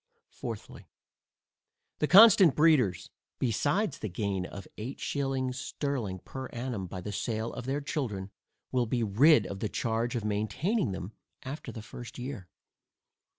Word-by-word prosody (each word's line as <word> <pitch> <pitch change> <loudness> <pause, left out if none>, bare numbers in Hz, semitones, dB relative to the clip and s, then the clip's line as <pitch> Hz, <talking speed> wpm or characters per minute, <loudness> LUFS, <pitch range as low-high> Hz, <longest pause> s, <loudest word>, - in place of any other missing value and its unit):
Fourthly, - - -7 1.1
The - - +2
constant 195 - +8
breeders, 145 - +3 0.3
besides 145 - 0
the 110 - -4
gain 95 0 -2
of 100 -2 -9
eight 120 +6 -5
shillings 135 -2 -1
sterling 130 -8 -3
per 130 -1 -6
annum 120 -6 -4
by 90 +1 -6
the 105 - -5
sale 110 +2 -2
of 125 - -6
their 140 +2 -1
children, 110 - -3 0.4
will 125 -2 +1
be 120 +1 0
rid 115 +4 +5
of 95 +1 -6
the 105 - -2
charge 115 +3 -1
of 115 -3 -2
maintaining 110 - 0
them 95 +1 -5 0.3
after 140 +3 -6
the 110 - -8
first 120 +1 -9
year. 125 -7 -6
120 Hz, 145 wpm, -30 LUFS, 105-140 Hz, 1.1 s, constant